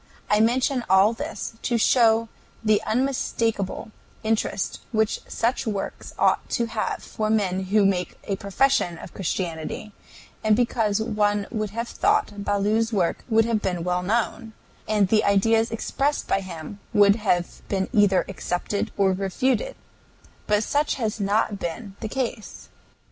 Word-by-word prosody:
I 210 - +5
mention 245 +3 +2
all 190 +4 +5
this 290 0 -5
to 240 - 0
show 230 -1 +4 0.4
the 215 -1 +3
unmistakable 230 -4 -1 0.3
interest 220 -2 -1
which 220 -2 +1
such 240 +2 -1
works 205 -3 -4
ought - - +2
to 235 - +1
have 225 -1 -3
for 215 -1 -3
men 190 -3 +1
who 205 +2 +3
make 180 -2 0
a 195 - -2
profession 200 -3 +1
of - - -10
Christianity, 175 +2 -3 0.5
and 215 -1 +4
because 225 -3 +1
one 210 -2 +1
would 215 -3 -2
have 230 +3 -4
thought 405 - 0
Ballou's 210 +3 +1
work 185 -6 0
would 225 -1 +4
have 225 -2 0
been 180 -4 -2
well 180 0 0
known, 225 +3 -1 0.3
and 210 -2 +3
the 215 +2 +3
ideas 225 +3 +3
expressed 275 +5 -1
by - - +2
him 180 +1 -8
would 205 +1 +5
lave 175 -4 0
been 190 -1 0
either 200 -3 +4
accepted 195 +1 -2
or 195 -1 +3
refuted; 255 - 0 0.7
but 210 +1 +2
such 290 +6 +1
has 225 -4 -2
not 205 0 +1
been 195 +4 -5
the 220 - -4
case. 240 -4 -4
215 Hz, 145 wpm, -24 LUFS, 195-230 Hz, 0.7 s, I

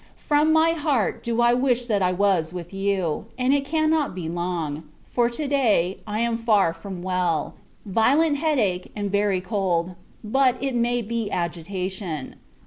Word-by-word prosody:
From 300 +1 +2
my 320 +1 +4
heart, 295 -9 0
do 235 0 0
I 240 0 +5
wish 250 -1 +1
that 210 -4 0
I 180 -1 +2
was 185 -4 +1
with 175 0 -8
you: 195 -4 -1
and 255 +1 +2
it 285 -1 +2
cannot 310 - +1
be 175 -3 -4
long; 170 -3 -3 0.3
for, 240 -1 +1
to 285 +5 -3
day, 215 -10 +2
I 210 +1 -2
am 235 -1 0
far 210 -7 +3
from 175 +1 -8
well; 180 -3 0 0.3
violent 280 - +3
head 310 0 +1
ache, 185 -6 0
and 205 -2 -3
very 200 -2 +1
cold; 185 -3 -1 0.3
but, 255 +3 +2
it 270 -1 -2
may 240 0 +1
be 230 -1 -3
agitation. 175 -2 -4
210 Hz, 165 wpm, -24 LUFS, 180-255 Hz, 0.3 s, I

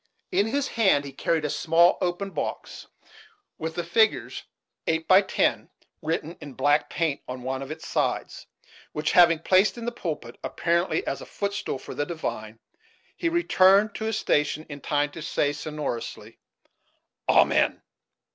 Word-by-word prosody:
In 205 - +2
his 280 +4 0
hand 190 -11 +3
he 140 - -7
carried 160 +2 -1
a - - -1
small 165 +4 +3
open 180 +2 -2
box, - - -5 0.7
with 160 0 -4
the 175 - -2
figures 220 +6 +1 0.5
"8 160 0 0
by 190 +1 +7
10" 190 - 0 0.3
written 160 +1 -3
in 145 -2 -9
black 145 +3 +2
paint 160 -4 -1
on 125 0 -6
one 130 +1 -3
of 135 - -7
its 160 +2 -7
sides; - - -2 0.5
which, 155 0 -1
having 170 -2 +6
placed 185 +7 +3
in 235 - -6
the 240 - -1
pulpit, 155 - -6
apparently 170 - 0
as - - -3
a - - -8
footstool 200 -7 -3
for - - -9
the 145 - -2
divine, 110 -10 -5 0.6
he 335 - -1
returned 205 - +4
to 220 - -5
his 220 -1 -1
station 150 -5 0
in 145 -1 -8
time 145 0 0
to 165 - -9
say, 145 -1 0
sonorously, 150 -5 -5 0.9
"Amen." - - +3
165 Hz, 155 wpm, -26 LUFS, 145-195 Hz, 0.9 s, by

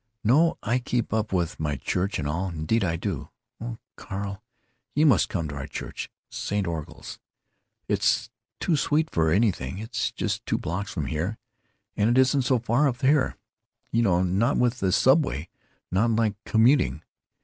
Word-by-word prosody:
"No, 155 +9 +4
I 120 +4 +1
keep 120 -2 -2
up 110 0 0
with 90 -4 -1
my 75 -2 -1
church 95 +9 -1
and 70 - -2
all—indeed 85 +5 -1
I 85 -3 0
do. 85 -4 -4 0.3
Oh, 115 0 -5 0.2
Carl, 100 0 -5 0.5
you 150 +2 +4
must 130 -9 +4
come 85 -4 -2
to 70 - -6
our 70 0 -5
church—St. 100 +6 -5
Orgul's. 80 -3 -6 0.7
It's - - +1 0.3
too 170 - +1
sweet 155 +2 +1
for 80 -1 +2
anything. 90 - +1
It's 110 +3 -2
just - - -2
two - - +1
blocks 95 +6 -3
from 80 -5 -3
here; 85 +10 -2 0.6
and 105 +2 +2
it 120 - +3
isn't 135 +1 +4
so 130 0 +2
far 120 +5 +2
up 120 -2 -5
here, 140 +1 +3 0.5
you 115 - +2
know, 90 -5 +3
not 100 +9 +2
with 125 0 +1
the 95 - +1
subway—not 90 - +1
like 110 -2 +2
commuting. 115 - +3
105 Hz, 160 wpm, -26 LUFS, 85-120 Hz, 0.7 s, No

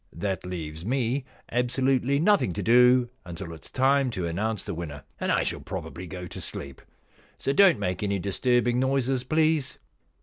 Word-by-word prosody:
That 95 +1 -3
leaves 80 -3 -6
me 130 +3 0 0.3
absolutely 130 +2 +1
nothing 180 - +3
to - - -3
do 125 +1 +5
until 85 0 -7
it 80 - -12
is - - -10
time 135 0 +3
to 90 - -1
announce 105 +5 -2
the - - -4
winner, 75 -4 -6 0.2
and - - 0
I - - +2
shall - - -2
probably 90 +2 -6
go 90 +1 -7
to 90 - -8
sleep. 70 -2 -6 0.6
So 135 - -1
don't 185 -2 +6
make 90 -3 -2
any 100 -1 0
disturbing 120 +6 +1
noises, 130 -1 +1
please. 155 -2 +1
120 Hz, 170 wpm, -26 LUFS, 90-130 Hz, 0.6 s, don't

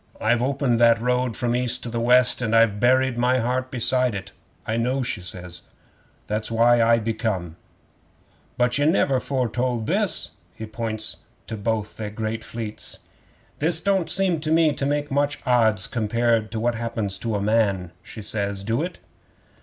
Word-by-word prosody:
I've 120 +2 +2
opened 130 -2 +1
that 115 -1 +5
road 125 -1 0
from 120 -1 -1
the 120 - +1
East 125 0 0
to 120 - -4
the 115 0 -3
West, 125 +2 +4
and 115 -2 0
I've 115 -3 +4
buried 130 +1 +3
my 125 +1 +3
heart 125 +2 -1
beside 125 -1 +1
it." 95 - -6 0.3
'"I 110 - -2
know," 130 +3 0
she 115 -5 -3
says. 90 0 -7 0.6
"That's 105 +1 -3
why 115 +1 +4
I 115 0 +5
be 115 0 -2
come." 95 -8 -3 1.0
'"But 125 +2 +2
ye 145 - +2
never 140 -5 +2
foretold 125 -2 -1
this"; - - 0 0.2
he 110 - -6
points 110 -1 -4 0.3
to 110 - -5
both 105 0 -3
they 110 -2 -4
great 110 +1 -4
fleets. 110 -2 -4 0.6
'"This 160 +2 +3
don't 190 -3 0
seem 185 -2 +2
to 155 0 -3
me 160 -2 +4
to 140 - -2
make 145 0 -1
much 145 +1 +1
odds 110 -6 +3
compared 115 0 0
to 110 - -3
what 120 +2 +1
happens 115 -4 -3
to 115 -2 -2
a - - 0
man," 100 -4 +1
she 110 0 -10
says. 100 -1 -1
"Do 115 +6 -1
it?" 180 +2 -4
115 Hz, 175 wpm, -23 LUFS, 110-130 Hz, 1.0 s, that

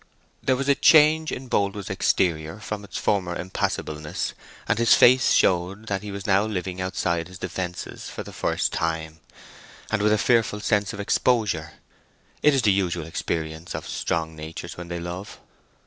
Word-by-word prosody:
There 130 - +2
was 135 +2 -3
a 140 - +6
change 155 +2 +5
in 130 - -5
Boldwood's 100 -3 -1
exterior 80 +1 0
from 105 -1 -5
its 100 - -7
former 90 -4 0
impassibleness; 75 -4 -3 0.3
and 115 - +1
his 115 - +6
face 130 +1 +6
showed 95 +4 +2
that 100 -1 -1
he 105 - -7
was 100 -1 -6
now 100 0 +4
living 95 -3 -3
outside 85 -2 -1
his 90 0 -11
defences 95 -1 -5
for - - -6
the - - -11
first - - -1
time, 80 -1 -2 0.7
and 110 -2 +1
with 105 +1 +3
a 110 - +4
fearful 115 -2 +2
sense 105 -1 +1
of 100 - -8
exposure. 100 - +1 0.7
It 150 -1 +5
is 130 - +1
the 105 - +5
usual 90 -4 -1
experience 80 0 -4
of - - -6
strong 80 -1 -2
natures 80 +2 -7
when 90 -1 -8
they 85 0 -4
love. 90 +3 -7
95 Hz, 170 wpm, -24 LUFS, 85-105 Hz, 0.7 s, a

